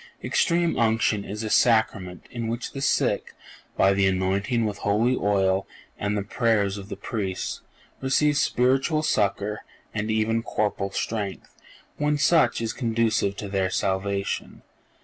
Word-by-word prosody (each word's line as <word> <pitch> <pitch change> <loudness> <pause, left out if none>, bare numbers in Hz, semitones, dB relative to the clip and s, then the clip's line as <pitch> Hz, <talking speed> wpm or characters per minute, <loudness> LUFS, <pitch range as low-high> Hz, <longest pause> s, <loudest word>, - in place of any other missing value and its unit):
Extreme 170 -1 +1
Unction 110 -2 +2
is 105 +3 -5
a 110 - -3
Sacrament 110 -6 +2
in 115 -2 -4
which 115 +2 -3
the 135 - -6
sick, - - 0 0.4
by 95 +1 +5
the 95 0 +3
anointing 95 +5 0
with 105 -1 -3
holy 110 +5 +2
oil 95 -3 +1 0.3
and 105 +1 -1
the 100 - -1
prayers 105 -2 +1
of 100 +1 -10
the - - -4
Priests, 95 -5 -4 0.4
receive 145 +3 +2
spiritual 135 +4 +2
succor 105 -4 0 0.3
and 110 0 -2
even 110 +1 +1
corporal 105 -3 -1
strength 100 0 -4 0.4
when 150 0 +1
such 150 -2 +3
is 115 -1 -2
conducive 115 -4 0
to 100 - -6
their 95 -1 0
salvation. 100 +1 -2
110 Hz, 140 wpm, -25 LUFS, 100-120 Hz, 0.4 s, by